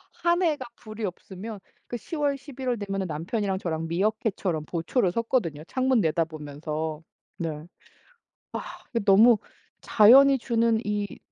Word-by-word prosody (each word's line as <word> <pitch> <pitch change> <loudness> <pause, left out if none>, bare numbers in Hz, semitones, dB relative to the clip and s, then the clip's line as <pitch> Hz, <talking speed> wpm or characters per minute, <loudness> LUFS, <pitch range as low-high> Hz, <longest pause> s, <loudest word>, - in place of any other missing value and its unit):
한 345 +1 +1
해가 300 -7 +1
불이 215 0 -8
없으면 195 +3 -7 0.3
그 240 - -4
10 320 - -7
월, 285 -2 +1
11 265 -1 -8
월 240 -3 -1
되면 195 -1 -2
남편이랑 190 +6 -2
저랑 165 -2 -3
미어캣처럼 190 -3 -1
보초를 175 - 0
섰거든요. 190 - -1
창문 260 -2 +2
내다보면서 155 -1 -2 0.4
네. 160 -2 -4 0.9
아 - - -3 0.4
너무 215 +3 +7 0.4
자연이 265 +5 +7
주는 230 -2 +1
이 205 -1 -3
205 Hz, 255 characters per minute, -26 LUFS, 165-240 Hz, 0.9 s, 너무